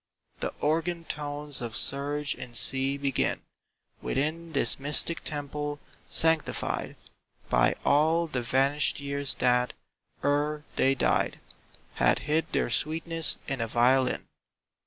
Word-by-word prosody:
The -, -, -2 dB
organ 165 Hz, +3 st, 0 dB
tones 145 Hz, -2 st, -4 dB
of 115 Hz, -2 st, -5 dB
surge 145 Hz, +1 st, -1 dB
and 120 Hz, -1 st, -4 dB
sea 135 Hz, +4 st, +6 dB
begin 140 Hz, -2 st, -1 dB, 0.6 s
Within 160 Hz, +4 st, -2 dB
this 135 Hz, -, +2 dB
mystic 150 Hz, +4 st, 0 dB
temple, 145 Hz, 0 st, -4 dB, 0.3 s
sanctified 160 Hz, -1 st, +1 dB, 0.6 s
By -, -, +3 dB
all 160 Hz, +4 st, +3 dB
the 130 Hz, -6 st, -3 dB
vanished 135 Hz, +6 st, +1 dB
years 140 Hz, -1 st, -1 dB
that, 125 Hz, 0 st, +2 dB, 0.5 s
ere 150 Hz, +1 st, 0 dB
they 135 Hz, +1 st, +3 dB
died, -, -, +1 dB, 0.5 s
Had -, -, +3 dB
hid 155 Hz, +2 st, 0 dB
their -, -, 0 dB
sweetness 165 Hz, +1 st, 0 dB
in 135 Hz, -3 st, -2 dB
a 115 Hz, -, -1 dB
violin. 125 Hz, +3 st, +2 dB
145 Hz, 115 wpm, -28 LUFS, 135-155 Hz, 0.6 s, sea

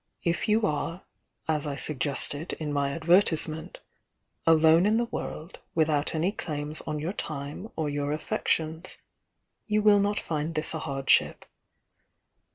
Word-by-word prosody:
If 170 Hz, +5 st, 0 dB
you 215 Hz, +1 st, +3 dB
are, 165 Hz, +2 st, -2 dB, 0.4 s
as 155 Hz, -2 st, 0 dB
I 140 Hz, -, -3 dB
sug 140 Hz, +1 st, -1 dB
gested 145 Hz, +3 st, 0 dB
in 150 Hz, -2 st, -4 dB
my 140 Hz, -1 st, +1 dB
advertisement, 160 Hz, -1 st, +1 dB, 0.7 s
'alone 165 Hz, +3 st, +6 dB
in 215 Hz, +1 st, +3 dB
the 240 Hz, -, +1 dB
world, 170 Hz, -6 st, -6 dB, 0.2 s
without 155 Hz, -1 st, +2 dB
any 170 Hz, +5 st, +1 dB
claims 150 Hz, -5 st, -4 dB
on 150 Hz, -, -2 dB
your 160 Hz, +6 st, -3 dB
time 150 Hz, +3 st, -5 dB
or 160 Hz, -2 st, -1 dB
your 145 Hz, 0 st, -2 dB
affections,' 160 Hz, +2 st, -2 dB, 0.7 s
you 210 Hz, -1 st, +1 dB
will 210 Hz, -1 st, +6 dB
not 205 Hz, +1 st, +1 dB
find 155 Hz, +1 st, -3 dB
this 155 Hz, +1 st, 0 dB
a 160 Hz, -, -3 dB
hardship. 135 Hz, -3 st, +1 dB
160 Hz, 145 wpm, -27 LUFS, 150-175 Hz, 0.7 s, alone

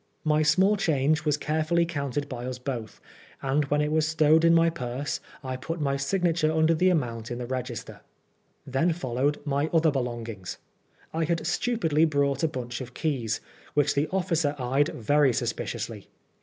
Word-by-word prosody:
My 155 Hz, -1 st, +3 dB
small 190 Hz, +7 st, +4 dB
change 155 Hz, -3 st, +1 dB
was 150 Hz, -1 st, +2 dB
carefully 155 Hz, +3 st, +1 dB
counted 145 Hz, -3 st, -3 dB
by 125 Hz, -2 st, -5 dB
us 130 Hz, -1 st, -4 dB
both, 125 Hz, -4 st, -5 dB, 0.4 s
and 140 Hz, +2 st, +1 dB
when 145 Hz, +1 st, +1 dB
it 150 Hz, 0 st, 0 dB
was 155 Hz, 0 st, +2 dB
stowed 160 Hz, 0 st, +4 dB
in 165 Hz, -, +6 dB
my 165 Hz, 0 st, +4 dB
purse, 130 Hz, -1 st, -3 dB, 0.2 s
I 130 Hz, -1 st, -3 dB
put 165 Hz, +6 st, -5 dB
my 140 Hz, -2 st, 0 dB
signature 165 Hz, +2 st, +1 dB
under 160 Hz, +1 st, +3 dB
the 180 Hz, +3 st, +3 dB
amount 115 Hz, -9 st, -1 dB
in 120 Hz, -, -4 dB
the 125 Hz, -, -4 dB
register. 125 Hz, -2 st, -5 dB, 0.6 s
Then 140 Hz, +6 st, +1 dB
followed 140 Hz, -2 st, -1 dB
my 145 Hz, +1 st, 0 dB
other 160 Hz, -1 st, +4 dB
belongings. 120 Hz, -8 st, -4 dB, 0.6 s
I 165 Hz, 0 st, 0 dB
had 165 Hz, -1 st, -1 dB
stupidly 165 Hz, -4 st, +2 dB
brought 140 Hz, -3 st, +1 dB
a 160 Hz, -, +3 dB
bunch 125 Hz, -4 st, -5 dB
of 125 Hz, -1 st, -9 dB
keys, 120 Hz, -8 st, -1 dB, 0.3 s
which 145 Hz, -1 st, +3 dB
the 145 Hz, +2 st, +1 dB
officer 165 Hz, -5 st, 0 dB
eyed 135 Hz, +3 st, +1 dB
very 140 Hz, +3 st, +2 dB
suspiciously. 115 Hz, -2 st, -3 dB
145 Hz, 170 wpm, -27 LUFS, 130-160 Hz, 0.6 s, in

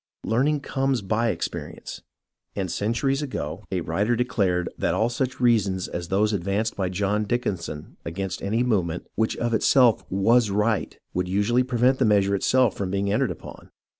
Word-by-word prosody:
Learning 135 Hz, +8 st, +1 dB
comes 135 Hz, -4 st, -1 dB
by 110 Hz, +4 st, +1 dB
experience, -, -, -5 dB, 0.5 s
and 95 Hz, -4 st, -2 dB
centuries 135 Hz, +7 st, 0 dB
ago 100 Hz, -, -4 dB
a 90 Hz, -2 st, 0 dB
writer 100 Hz, +9 st, 0 dB
declared 100 Hz, -8 st, 0 dB
that -, -, 0 dB
all 115 Hz, +2 st, +2 dB
such 125 Hz, +2 st, -2 dB
reasons 100 Hz, -7 st, +2 dB
as 85 Hz, -1 st, -5 dB
those 105 Hz, +3 st, +1 dB
advanced 100 Hz, +4 st, -1 dB
by 95 Hz, -2 st, -1 dB
John 100 Hz, +3 st, 0 dB
Dickinson 95 Hz, -9 st, -3 dB
against 95 Hz, +2 st, -4 dB
any 110 Hz, +5 st, 0 dB
movement 90 Hz, -8 st, 0 dB
which 110 Hz, 0 st, 0 dB
of 120 Hz, 0 st, -1 dB
itself 120 Hz, 0 st, +4 dB
zvas 110 Hz, +4 st, +3 dB
right, 105 Hz, +1 st, 0 dB, 0.2 s
would 90 Hz, 0 st, -1 dB
usually 105 Hz, +6 st, +2 dB
prevent 125 Hz, +1 st, +2 dB
the 130 Hz, -, +3 dB
meas 105 Hz, -2 st, +4 dB
ure 100 Hz, -, 0 dB
itself 125 Hz, +3 st, +2 dB
from 95 Hz, -2 st, -3 dB
being 100 Hz, +1 st, 0 dB
entered -, -, +1 dB
upon. -, -, -9 dB
105 Hz, 165 wpm, -24 LUFS, 95-120 Hz, 0.5 s, itself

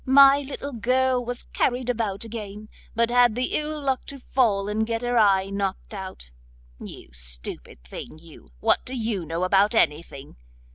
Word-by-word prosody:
My 275 Hz, +1 st, +7 dB
little 280 Hz, 0 st, -6 dB
girl 250 Hz, +2 st, +1 dB
was 245 Hz, +1 st, -5 dB
carried 250 Hz, 0 st, 0 dB
about 220 Hz, -4 st, -1 dB
again, 215 Hz, -2 st, -8 dB, 0.3 s
but 235 Hz, +1 st, +2 dB
had 245 Hz, -2 st, +5 dB
the 250 Hz, +1 st, -1 dB
ill 305 Hz, 0 st, -1 dB
luck 270 Hz, -3 st, -1 dB
to 280 Hz, -, -7 dB
fall 225 Hz, -6 st, +1 dB
and 210 Hz, +1 st, 0 dB
get 230 Hz, +1 st, -2 dB
her 245 Hz, 0 st, 0 dB
eye 195 Hz, -2 st, +3 dB
knocked 200 Hz, +1 st, -3 dB
out. 190 Hz, -, -8 dB, 0.5 s
You -, -, -10 dB
stupid -, -, -4 dB
thing, 60 Hz, -, -9 dB
you, 165 Hz, 0 st, -16 dB
what -, -, +3 dB
do 260 Hz, -, -5 dB
you 220 Hz, -6 st, -2 dB
know 165 Hz, +3 st, -2 dB
about 200 Hz, +4 st, +3 dB
anything? 150 Hz, -, -1 dB
220 Hz, 165 wpm, -24 LUFS, 195-250 Hz, 0.5 s, My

